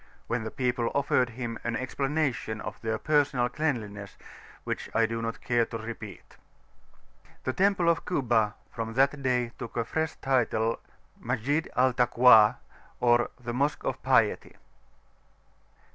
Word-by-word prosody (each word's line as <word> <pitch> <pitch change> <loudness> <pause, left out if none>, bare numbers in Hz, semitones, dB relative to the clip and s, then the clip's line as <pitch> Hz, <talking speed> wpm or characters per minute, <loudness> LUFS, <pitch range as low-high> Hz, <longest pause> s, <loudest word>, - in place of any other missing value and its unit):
when 120 -1 -2
the 110 - -4
people 125 -1 -1
offered 130 -3 +2
him 120 -1 -5
an 120 0 -2
explanation 135 -4 -2
of 105 +1 -7
their 110 -1 -1
personal 140 -3 +2
cleanliness 110 -8 -3 0.5
which - - -4
I 115 - +4
do 115 0 -3
not 115 +1 -4
care 120 -2 +2
to 115 - -5
repeat. 115 0 -9 1.1
The 130 - -1
temple 190 -1 +2
of 170 -1 +2
Kuba 115 - +1 0.2
from 115 -1 -5
that 140 +2 +2
day 125 -3 0
took 120 -1 -7
a 115 - 0
fresh 160 +5 -2
title 115 -4 0 0.4
Masjid 130 +6 -1
al 130 0 +3
Takwa, 120 -3 +6 0.4
or 120 0 +3
the 120 -1 -5
"Mosque 140 +4 0
of - - -3
Piety." 125 -5 +2
125 Hz, 140 wpm, -28 LUFS, 115-135 Hz, 1.1 s, Takwa